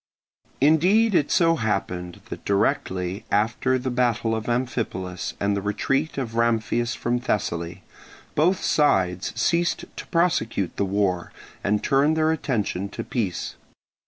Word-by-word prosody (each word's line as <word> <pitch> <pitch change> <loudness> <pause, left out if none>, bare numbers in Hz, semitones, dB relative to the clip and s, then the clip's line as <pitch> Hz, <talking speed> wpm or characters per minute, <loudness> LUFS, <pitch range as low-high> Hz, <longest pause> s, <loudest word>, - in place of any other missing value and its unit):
Indeed 180 - +4
it 150 -5 +3
so 165 -2 +3
happened 90 -5 -2
that - - -7
directly 95 -1 0
after 115 +5 +1
the 130 0 -3
battle 120 -2 +1
of 110 +1 -3
Amphipolis 115 -7 -2
and 100 0 +1
the 100 - -1
retreat 135 +10 -1
of 125 -5 -3
Ramphias 115 +1 +1
from 120 +1 -1
Thessaly, 85 -8 -2 0.5
both 175 +5 +2
sides 95 - +2
ceased 170 0 +1
to - - -7
prosecute 165 - 0
the 100 - +1
war 95 -2 0 0.3
and 105 +1 +1
turned 145 +3 +3
their 160 0 +3
attention 105 - -1
to - - -5
peace. 105 -8 -2
115 Hz, 130 wpm, -24 LUFS, 100-145 Hz, 0.5 s, Indeed